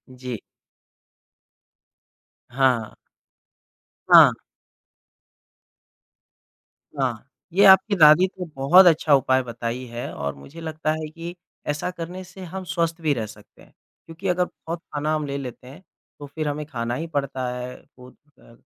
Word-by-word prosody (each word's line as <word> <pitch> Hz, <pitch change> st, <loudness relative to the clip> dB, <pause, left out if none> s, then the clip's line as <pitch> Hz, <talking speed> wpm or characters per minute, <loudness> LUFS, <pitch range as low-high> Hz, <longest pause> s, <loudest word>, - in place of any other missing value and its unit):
जी। 125 Hz, -3 st, -6 dB, 2.1 s
हाँ। 125 Hz, -3 st, +1 dB, 1.2 s
हाँ। -, -, +9 dB, 2.7 s
हाँ, 130 Hz, -1 st, -2 dB, 0.2 s
ये 200 Hz, +3 st, +5 dB
आपकी 190 Hz, +2 st, +6 dB
दादी 155 Hz, +2 st, +7 dB
तो 185 Hz, -1 st, -8 dB
बहुत 175 Hz, +8 st, +6 dB
अच्छा 160 Hz, -2 st, +4 dB
उपाय 130 Hz, -1 st, +2 dB
बताई 120 Hz, +1 st, -5 dB
है 120 Hz, +1 st, -6 dB
और 70 Hz, 0 st, -4 dB
मुझे 140 Hz, -, -12 dB
लगता 155 Hz, -1 st, -2 dB
है 155 Hz, -1 st, -5 dB
कि 170 Hz, +2 st, -8 dB, 0.3 s
ऐसा 150 Hz, +4 st, -2 dB
करने 180 Hz, +1 st, -7 dB
से 180 Hz, +1 st, -13 dB
हम 190 Hz, -, -4 dB
स्वस्थ 170 Hz, -2 st, -2 dB
भी 155 Hz, -2 st, +2 dB
रह 115 Hz, -5 st, -3 dB
सकते 105 Hz, -1 st, -16 dB
हैं -, -, -20 dB, 0.3 s
क्योंकि 165 Hz, +4 st, -7 dB
अगर 180 Hz, 0 st, +2 dB
बहुत 165 Hz, 0 st, -8 dB
खाना 150 Hz, +1 st, -1 dB
हम 155 Hz, -1 st, -2 dB
ले 140 Hz, 0 st, -4 dB
लेते 125 Hz, -2 st, -8 dB
हैं, 145 Hz, +8 st, -12 dB, 0.4 s
तो 145 Hz, -, -8 dB
फिर 155 Hz, +2 st, -4 dB
हमें 150 Hz, +1 st, -3 dB
खाना 120 Hz, -5 st, -4 dB
ही 165 Hz, +5 st, -4 dB
पड़ता 140 Hz, -4 st, -3 dB
है, 125 Hz, 0 st, -6 dB, 0.2 s
वो 125 Hz, 0 st, -13 dB
अ, 145 Hz, -3 st, -23 dB
150 Hz, 140 wpm, -23 LUFS, 125-170 Hz, 2.7 s, हाँ